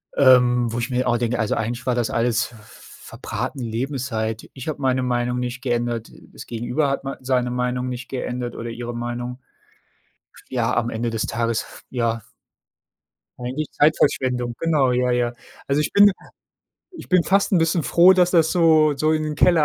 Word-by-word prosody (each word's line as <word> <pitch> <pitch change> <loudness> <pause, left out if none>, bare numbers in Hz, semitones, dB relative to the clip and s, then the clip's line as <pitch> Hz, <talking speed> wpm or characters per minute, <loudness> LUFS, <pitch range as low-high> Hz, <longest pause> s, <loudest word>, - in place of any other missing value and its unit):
ähm, 125 -3 +5
wo 120 - -4
ich 120 +2 -2
mir 125 0 0
auch 120 - +2
denke: 120 0 -1
„Also 105 - 0
eigentlich 120 +3 -3
war 125 -2 +1
das 120 -2 0
alles 120 +1 0 0.2
verbratene 130 - -7
Lebenszeit.” 115 -2 -3
Ich 130 +2 -9
habe 150 -2 -4
meine 130 -1 +1
Meinung 125 0 -1
nicht 125 0 -4
geändert, 120 -2 -2 0.2
das - - -10
Gegenüber 125 +5 -1
hat 135 - -2
mei 135 - -5
seine 125 -1 0
Meinung 125 0 -1
nicht 125 0 -6
geändert 125 -2 -4
oder 115 0 -5
ihre 120 +1 -6
Meinung. 120 +1 -5 1.1
Ja, 120 -3 0
am 120 -1 0
Ende 115 +1 -2
des 115 -1 -2
Tages, 115 -1 -1 0.2
ja 115 -3 -1 1.2
eigentlich 130 +5 -4
Zeitverschwendung. 130 -5 +1
Genau, 150 -6 +2
ja, 125 0 +1
ja. 120 0 0 0.3
Also, 140 +2 +2
ich - - -2
bin 205 0 +7 0.8
ich 345 - -11
bin 180 -2 +3
fast 195 +1 +2
'n 180 - +5
bisschen 165 0 +1
froh, 180 +2 +6
dass 180 -1 +3
das 165 -3 +3
so 160 -4 +4
so 155 +2 +1
in 155 0 0
den 150 0 -3
Keller 165 0 +4
125 Hz, 175 wpm, -22 LUFS, 120-145 Hz, 1.2 s, bin